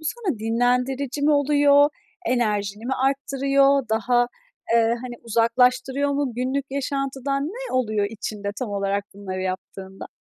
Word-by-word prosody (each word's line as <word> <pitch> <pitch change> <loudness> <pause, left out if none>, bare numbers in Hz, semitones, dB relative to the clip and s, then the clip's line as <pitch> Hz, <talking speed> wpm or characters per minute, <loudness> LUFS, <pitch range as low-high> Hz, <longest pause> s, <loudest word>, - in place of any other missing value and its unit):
bu 315 - -14
sana 360 - -2
dinlendirici 250 +5 0
mi 300 - +4
oluyor, 285 0 +5 0.4
enerjini 215 -2 0
mi 265 - -1
arttırıyor, 275 -1 +2
daha, 240 +2 +2 0.5
ııı, 230 -1 +5 0.2
hani, 245 -1 -6
uzaklaştırıyor 250 +4 +2
mu, 280 -3 -1
günlük 260 +3 -1
yaşantıdan? 275 0 -2
Ne - - -7
oluyor 215 -5 +1
içinde, 210 -2 -5
tam 245 -5 -3
olarak 200 0 -1
bunları 190 -2 -5
yaptığında? 190 +1 -6
250 Hz, 130 wpm, -23 LUFS, 220-275 Hz, 0.5 s, oluyor